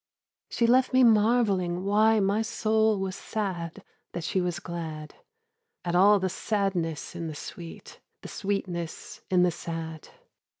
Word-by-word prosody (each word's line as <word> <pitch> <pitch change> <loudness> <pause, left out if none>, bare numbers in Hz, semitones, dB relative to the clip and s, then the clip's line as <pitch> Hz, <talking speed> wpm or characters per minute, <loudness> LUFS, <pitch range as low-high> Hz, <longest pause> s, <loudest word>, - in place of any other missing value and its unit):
She 235 - +1
left 255 +2 +4
me 260 0 +6
marvelling 210 -6 +3
why 215 +2 +4
my 200 +2 +2
soul 220 -1 +1
Was 190 -1 -3
sad 185 -8 -4 0.3
that 170 - -4
she 185 - 0
was 175 0 -2
glad; 160 -4 -6 0.7
At 175 - -1
all 200 +3 +6
the 190 - 0
sadness 185 -5 -2
in 170 -1 -4
the 155 - -6
sweet, 165 +3 -9 0.2
The - - -7
sweetness 185 -5 -4
in 180 -1 +4
the 180 - +3
sad. 165 -2 -6
190 Hz, 140 wpm, -27 LUFS, 170-215 Hz, 0.7 s, me